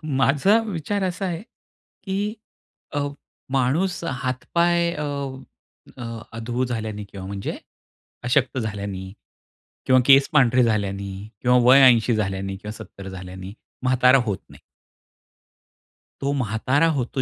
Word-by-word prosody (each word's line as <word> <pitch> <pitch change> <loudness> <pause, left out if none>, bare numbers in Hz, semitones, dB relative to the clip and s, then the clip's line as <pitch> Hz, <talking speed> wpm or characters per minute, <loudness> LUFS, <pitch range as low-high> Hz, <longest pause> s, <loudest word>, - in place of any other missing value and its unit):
माझा 145 +8 +3
विचार 200 +1 -2
असा 185 +1 -2
आहे, 170 0 -3 0.6
की 205 +2 -2 0.6
अ, 145 - +1 0.5
माणूस 140 +8 +1
हात-पाय 170 +6 0
अ, 150 - -3 0.9
अ, 125 - -8 0.3
अधू 120 +2 -2
झाल्याने 110 -4 -4
किंवा 100 -2 -9
म्हणजे 100 0 -5 0.7
अशक्त 130 +1 +1
झाल्याने 100 -4 -4 0.7
किंवा 130 0 +5
केस 135 0 +7
पांढरे 130 -4 +5
झाल्याने 100 -3 -1 0.3
किंवा 125 0 +4
वय 130 +3 +7
80 120 -1 +5
झाल्याने 95 -2 -2
किंवा 105 +2 -7
70 95 -1 -10
झाल्याने 95 0 -8 0.3
म्हातारा 130 +1 +5
होत 100 -3 -1
नाही. - - -15 1.6
तो 140 - 0
म्हातारा 130 +5 +1
होतो 130 +1 -2
125 Hz, 115 wpm, -23 LUFS, 105-145 Hz, 1.6 s, केस